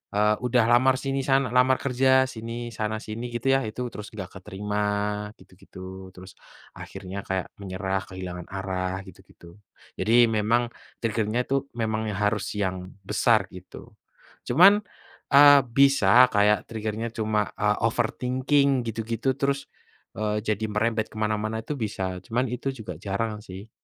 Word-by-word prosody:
eee, 105 +1 +2
udah 125 -1 +2
lamar 130 +2 +5
sini 135 +1 -2
sana 135 -3 +2
lamar 125 +1 +4
kerja, 130 0 +4
sini, 120 -1 -6
sana 110 0 -3
sini 115 +3 -5
gitu 120 +3 -1
ya, 135 - +4
itu 125 +3 -5
terus 105 0 -8
nggak 95 -1 -8
keterima 105 +1 -4 0.6
gitu-gitu, 95 0 -12
terus, 95 0 -13 0.3
akhirnya 95 0 -8
kayak 95 -1 -2
menyerah 95 0 -3
kehilangan 90 -1 -7
arah 95 -1 -3
gitu-gitu. 85 0 -16 0.4
Jadi 120 +2 +5
memang, 115 +3 +1 0.3
trigger-nya 110 +2 0
itu 135 +1 -1
memang 110 -1 -1
harus 105 0 0
yang 95 -2 -3
besar 105 +1 +2
gitu. 90 0 -12 0.6
Cuman, 195 +11 +6 0.5
eee, 145 0 +9 0.2
bisa 130 -3 +6
kayak 105 -1 +3
trigger-nya, 110 +1 -3
cuma, 105 -2 0
eee, 105 -1 +1
overthinking 130 +3 +1
gitu-gitu, 115 +3 -2
terus, 140 0 -1 0.5
eee, 105 0 -1
jadi 110 0 -1
merembet 110 +1 0
ke - - -16
mana-mana 110 +1 -1
itu 150 - -4
bisa, 95 -4 -3
cuman 120 +3 0
itu 125 +2 -3
juga 105 -7 -7
jarang 105 +2 -3
sih. 95 +2 -10
110 Hz, 140 wpm, -25 LUFS, 100-125 Hz, 0.6 s, eee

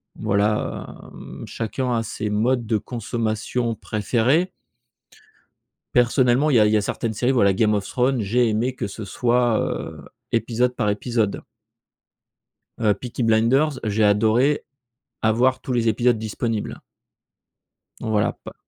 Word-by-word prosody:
Voilà, 105 0 -1 0.3
hem, - - -10
chacun 125 +3 -3
a 115 - -1
ses 105 0 -4
modes 120 +4 +1
de 110 0 +1
consommation 115 +1 -2
préférés. 120 - 0 1.5
Personnellement, 125 +3 +3
il 140 - +2
y 115 - +6
a 105 - +5
il 105 - +2
y 110 - +4
a - - +1
certaines 110 +2 -3
séries, 125 +5 +1
voilà, 100 -6 +4
Game 105 +2 +2
of 100 -1 -1
Thrones 125 0 +1
j'ai 115 +4 +2
aimé 115 +4 0
que 105 - -3
ce 110 +3 -8
soit, 120 +3 +1
heu, 75 -3 -4 0.3
épisode 120 +2 +1
par 105 -4 0
épisode. 110 0 -1 1.4
Heu, 110 -2 +3
Peaky 125 -1 -5
Blinders 125 +6 +2
j'ai 110 0 +1
adoré 110 +8 +3 0.6
avoir 120 +4 +2
tous 130 - -4
les 115 -1 +1
épisodes 120 +2 +2
disponibles. 110 0 -3 1.2
Voilà, 110 -3 0
pas - - -9
115 Hz, 140 wpm, -22 LUFS, 105-125 Hz, 1.5 s, y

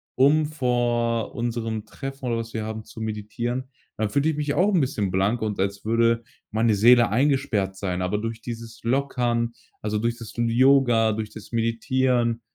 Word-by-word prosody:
um 150 +4 +4
vor 120 -5 0
unserem 115 -2 -3
Treffen 135 +4 -7
oder 120 -2 0
was 115 0 -5
wir 110 -1 -3
haben, 110 0 -5
zu 110 - -12
meditieren, 110 +4 -3 0.3
dann 110 -1 0
fühle 140 +7 +2
ich - - -4
mich 150 -1 -1
auch 200 +3 +3
'n 170 - +4
bisschen 105 -7 -1
blank 100 +6 +1
und 105 -3 -2
als 100 +1 -2
würde 115 +1 +2 0.3
meine 110 0 +2
Seele 120 +3 +6
eingesperrt 110 -6 +1
sein, 90 -2 -2
aber 90 +3 0
durch 115 +1 -4
dieses 115 -1 -8
Lockern, 120 -2 0 0.3
also 105 0 -1
durch 115 +2 -1
das 115 -1 -10
L 115 0 +1
Yoga, 120 -3 +4
durch 110 0 -4
das 110 - -11
Meditieren, 115 +1 +1
115 Hz, 175 wpm, -24 LUFS, 110-125 Hz, 0.3 s, Seele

